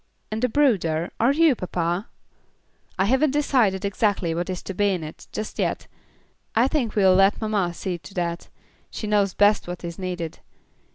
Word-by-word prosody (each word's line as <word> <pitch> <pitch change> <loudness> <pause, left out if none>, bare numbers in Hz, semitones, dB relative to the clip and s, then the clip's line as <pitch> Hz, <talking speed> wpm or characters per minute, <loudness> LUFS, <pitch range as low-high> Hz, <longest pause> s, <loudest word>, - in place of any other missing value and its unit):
and 220 +2 -3
a 250 - +3
brooder? 185 - +1
Are 235 +4 +4
you, 320 0 +4
papa?" 180 -1 -2 0.9
"I 190 - +2
haven't 265 +7 +3
decided 250 -9 +1
exactly 200 -4 0
what 175 +2 -3
is 185 -1 -4
to 195 - -5
be 205 +2 +2
in 180 -4 -1
it, 155 +1 -10
just 215 - -5
yet. - - -1 0.7
I 235 +3 +4
think 270 -7 -1
we'll 190 -3 +5
let 195 +2 +4
mamma 210 -5 0
see 180 -1 -4
to 190 - -13
that 170 -1 -3 0.4
she - - -6
knows 205 -3 +1
best 205 -1 +3
what 180 0 -6
is 170 +1 -6
needed. 175 -3 -4
195 Hz, 175 wpm, -24 LUFS, 175-220 Hz, 0.9 s, we'll